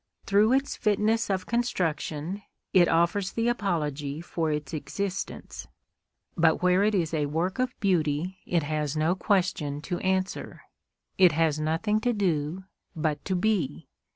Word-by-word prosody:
Through 210 +4 +4
its 270 +1 +1
fitness 215 +2 +1
of 190 -2 -1
construction, 180 -6 -2 0.3
it 180 -3 +6
offers 180 +4 +1
the 230 0 0
apology 155 -10 -1
for 165 -1 -2
its 150 +1 -3
existence. 195 +5 -4 0.7
But 165 0 +3
where 180 +2 +4
it 210 0 +2
is 170 -4 0
a 150 -2 +1
work 170 - -1
of 255 0 -1
beauty 180 -1 0
it 170 -3 +1
has 150 0 -2
no 155 +3 +2
question 180 -7 0
to 175 +1 -3
answer; 190 0 -2 0.6
it 180 -4 +7
has 155 -1 +2
nothing 165 +8 +1
to 245 +2 +1
do, 175 -3 -1 0.3
but 155 -2 -1
to 190 - 0
be. 175 -8 -1
180 Hz, 145 wpm, -27 LUFS, 155-200 Hz, 0.7 s, it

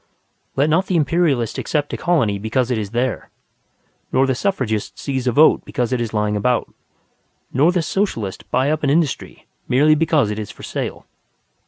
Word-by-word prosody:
Let 140 +2 +2
not 165 +5 +2
the 185 - 0
Imperialist 150 -6 +1
accept 145 -2 -2
a - - 0
colony 125 - +1
because 120 +4 -1
it 120 - +1
is 105 -2 -4
there, 120 +2 -2 0.8
nor 130 - +3
the 135 - +1
Suffragist 125 - -2
seize 130 -2 -3
a - - +3
vote 150 +6 +5
because 125 0 -2
it 125 - 0
is 115 -2 -3
lying 105 -1 0
about, 120 +4 0 0.8
nor 150 +7 +4
the 180 -2 0
Socialist 120 - -2
buy 130 +3 +1
up 155 0 -1
an 145 - +1
industry 150 -2 -1 0.2
merely 145 +5 +4
because 155 -7 +2
it 105 - -4
is 105 - -5
for - - -12
sale. - - -4
130 Hz, 180 wpm, -20 LUFS, 115-155 Hz, 0.8 s, vote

